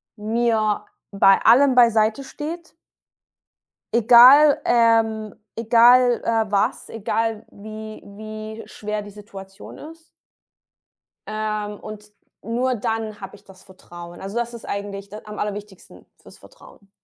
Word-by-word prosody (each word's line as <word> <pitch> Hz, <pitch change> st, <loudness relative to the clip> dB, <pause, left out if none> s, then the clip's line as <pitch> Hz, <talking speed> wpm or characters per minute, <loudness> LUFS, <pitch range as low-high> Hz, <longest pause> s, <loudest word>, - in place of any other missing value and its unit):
mir 220 Hz, -1 st, -1 dB, 0.3 s
bei 195 Hz, -1 st, +4 dB
allem 260 Hz, +4 st, +5 dB
beiseite 230 Hz, +1 st, +3 dB
steht. 320 Hz, +4 st, -8 dB, 1.2 s
Egal 250 Hz, +6 st, +7 dB
ähm, 225 Hz, -2 st, +1 dB, 0.2 s
egal, 240 Hz, +2 st, +4 dB
äh, 225 Hz, -2 st, -1 dB
was, 205 Hz, +5 st, -1 dB
egal 225 Hz, 0 st, -3 dB
wie 215 Hz, +1 st, -10 dB
wie 215 Hz, +2 st, -9 dB
schwer 210 Hz, 0 st, -6 dB
die 205 Hz, -, -11 dB
Situation 195 Hz, -1 st, -13 dB
ist 325 Hz, +2 st, -13 dB, 1.2 s
ähm, 215 Hz, -1 st, -4 dB
und 210 Hz, 0 st, -11 dB, 0.3 s
nur 245 Hz, +4 st, -1 dB
dann 220 Hz, -1 st, -4 dB
habe 195 Hz, +1 st, -9 dB
ich 200 Hz, -, -20 dB
das 190 Hz, -2 st, -18 dB
Vertrauen. 175 Hz, -2 st, -13 dB
Also, 195 Hz, +4 st, -6 dB
das 240 Hz, 0 st, -3 dB
ist 235 Hz, -, -10 dB
eigentlich 200 Hz, 0 st, -6 dB
d 210 Hz, -, -9 dB
am 210 Hz, 0 st, -9 dB
aller 210 Hz, 0 st, -2 dB
wichtigsten 205 Hz, -2 st, -13 dB
für -, -, -29 dB
das -, -, -15 dB
Vertrauen. 210 Hz, -, -19 dB
215 Hz, 125 wpm, -21 LUFS, 205-235 Hz, 1.2 s, Egal